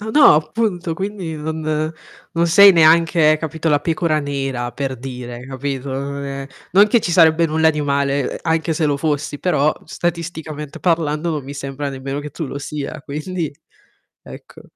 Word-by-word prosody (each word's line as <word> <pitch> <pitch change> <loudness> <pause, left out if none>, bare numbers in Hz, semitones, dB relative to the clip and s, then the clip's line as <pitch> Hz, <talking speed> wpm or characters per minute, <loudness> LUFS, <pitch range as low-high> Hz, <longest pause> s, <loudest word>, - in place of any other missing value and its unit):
A 215 +1 -5
no 295 - +7
appunto 175 +2 -1
quindi 190 -3 -4
non 155 0 -2 0.4
non 170 +1 +1
sei 200 +4 +8
neanche, 160 -1 +5
capito, 160 +1 -3
la 145 -1 +3
pecora 160 -1 0
nera 135 -4 -3
per 135 0 -3
dire, 125 -1 -7
capito, 135 0 -4
non 140 +1 -4
è 135 0 -5 0.3
non 200 +3 +7
che 230 +2 +3
ci 180 - -2
sarebbe 165 -1 +5
nulla 160 0 +3
di 150 - -3
male, 140 -1 0
ehm, - - -5
anche 160 0 0
se 155 0 0
lo 145 - +1
fossi, 145 0 -2
però 150 -4 +2
statisticamente 160 -3 -4
parlando, 165 -2 0
non 150 -3 -2
mi 140 +2 -8
sembra 140 0 -4
nemmeno 135 +1 -5
che 150 0 -7
tu 160 +2 -5
lo 140 - -6
sia 145 +1 -5
quindi 155 +2 -4 0.7
ecco. - - -13
155 Hz, 170 wpm, -19 LUFS, 140-165 Hz, 0.7 s, sei